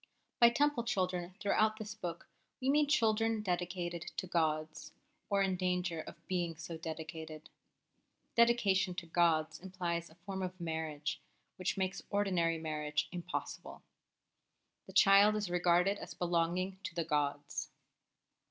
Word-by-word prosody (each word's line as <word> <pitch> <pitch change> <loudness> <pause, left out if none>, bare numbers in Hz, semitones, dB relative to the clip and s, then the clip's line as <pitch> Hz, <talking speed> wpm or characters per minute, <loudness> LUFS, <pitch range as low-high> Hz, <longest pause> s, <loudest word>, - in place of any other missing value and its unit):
By 235 -2 +9
Temple 285 0 +2
children 185 -4 -1
throughout 215 +1 +2
this 215 -1 -6
book 175 -6 -6 0.3
we 265 +1 +2
mean 295 0 +4
children 225 -5 +2
dedicated 175 -2 -2
to - - -1
gods, 155 -2 -1 0.4
or 200 -1 +3
in 190 -1 +1
danger 180 -2 -1
of - - -12
being 175 -3 -1
so 160 +1 -7
dedicated. 160 -1 -7 0.8
Dedication 205 -6 +4
to 175 - -5
gods 165 -2 +2
implies 175 -2 -3
a 160 - -18
form 190 +2 -6
of 185 0 -4
marriage 155 -2 -3 0.4
which 185 +1 -1
makes 190 0 -1
ordinary 180 -5 +1
marriage 150 -1 -2
impossible. 175 -1 -5 1.0
The - - -11
child 200 +2 +7
is 210 -4 -2
regarded 180 +3 +3
as - - -8
belonging 175 +2 0
to 170 - -5
the 170 -2 -1
gods. 145 -2 -1
180 Hz, 135 wpm, -34 LUFS, 165-195 Hz, 1.0 s, By